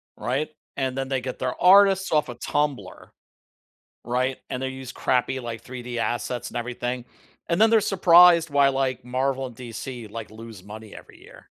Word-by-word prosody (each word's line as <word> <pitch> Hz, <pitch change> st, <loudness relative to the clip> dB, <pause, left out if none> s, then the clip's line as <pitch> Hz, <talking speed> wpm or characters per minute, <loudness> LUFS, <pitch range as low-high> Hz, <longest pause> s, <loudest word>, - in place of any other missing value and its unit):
right? 135 Hz, +6 st, -2 dB, 0.3 s
And 130 Hz, -1 st, -2 dB
then 135 Hz, 0 st, -3 dB
they 135 Hz, -1 st, 0 dB
get 130 Hz, 0 st, -6 dB
their 130 Hz, -1 st, -3 dB
artists 195 Hz, 0 st, +6 dB
off 150 Hz, -2 st, +2 dB
of 120 Hz, 0 st, -8 dB
Tumblr, 140 Hz, -11 st, -3 dB, 1.0 s
right? 130 Hz, +2 st, -1 dB
And 125 Hz, -, -4 dB
they 130 Hz, -, -1 dB
use 130 Hz, -1 st, -8 dB
crappy, 130 Hz, +1 st, 0 dB
like, 115 Hz, -2 st, -6 dB
3D 125 Hz, -1 st, -7 dB
assets 120 Hz, +1 st, -2 dB
and -, -, -6 dB
everything, 120 Hz, +1 st, -4 dB, 0.5 s
and 170 Hz, -, +1 dB
then 220 Hz, 0 st, +6 dB
they're 225 Hz, -2 st, +4 dB
surprised 175 Hz, -4 st, +6 dB
why, 140 Hz, -1 st, +4 dB
like, 135 Hz, -1 st, -1 dB
Marvel 130 Hz, +1 st, -1 dB
and 120 Hz, -, -13 dB
DC, 120 Hz, -1 st, -7 dB
like, 110 Hz, 0 st, -8 dB
lose 110 Hz, -3 st, -11 dB
money 105 Hz, +1 st, -11 dB
every -, -, -14 dB
year. -, -, -15 dB
130 Hz, 175 wpm, -24 LUFS, 120-145 Hz, 1.0 s, artists